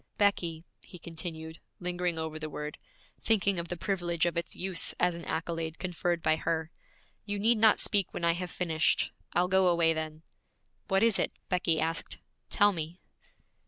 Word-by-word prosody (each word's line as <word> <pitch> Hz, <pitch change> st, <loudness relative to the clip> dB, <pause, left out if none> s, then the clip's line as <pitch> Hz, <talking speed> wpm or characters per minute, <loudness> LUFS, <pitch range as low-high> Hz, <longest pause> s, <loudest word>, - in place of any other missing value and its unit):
'Becky,' 170 Hz, -6 st, +1 dB, 0.2 s
he 180 Hz, -, -12 dB
continued, 160 Hz, -1 st, -6 dB, 0.2 s
lingering 180 Hz, -1 st, -1 dB
over 160 Hz, -1 st, -3 dB
the 155 Hz, 0 st, -4 dB
word, 150 Hz, 0 st, -6 dB, 0.4 s
thinking 200 Hz, -4 st, +2 dB
of 170 Hz, -, -4 dB
the 175 Hz, -, -4 dB
privilege 175 Hz, -2 st, 0 dB
of 175 Hz, -, 0 dB
its 170 Hz, -1 st, -2 dB
use 185 Hz, -1 st, 0 dB
as 180 Hz, 0 st, +3 dB
an 170 Hz, 0 st, -7 dB
accolade 165 Hz, 0 st, -3 dB
conferred 175 Hz, -2 st, -1 dB
by 155 Hz, 0 st, +4 dB
her, 160 Hz, +2 st, -1 dB, 0.5 s
'you 205 Hz, 0 st, -3 dB
need 220 Hz, +2 st, +3 dB
not 220 Hz, -1 st, +6 dB
speak 200 Hz, -4 st, +2 dB
when 170 Hz, -, -2 dB
I 170 Hz, -, +5 dB
have 180 Hz, +1 st, -4 dB
finished; 160 Hz, -4 st, +1 dB, 0.2 s
I'll 180 Hz, +1 st, +3 dB
go 190 Hz, 0 st, +4 dB
away 170 Hz, -2 st, +4 dB
then.' 155 Hz, 0 st, -5 dB, 0.6 s
'What 195 Hz, +1 st, +3 dB
is 230 Hz, -3 st, +4 dB
it?' -, -, 0 dB, 0.2 s
Becky 180 Hz, -3 st, +2 dB
asked. 165 Hz, +1 st, -1 dB, 0.3 s
'Tell 205 Hz, -1 st, +4 dB
me.' 165 Hz, +1 st, -5 dB
170 Hz, 170 wpm, -30 LUFS, 160-185 Hz, 0.6 s, not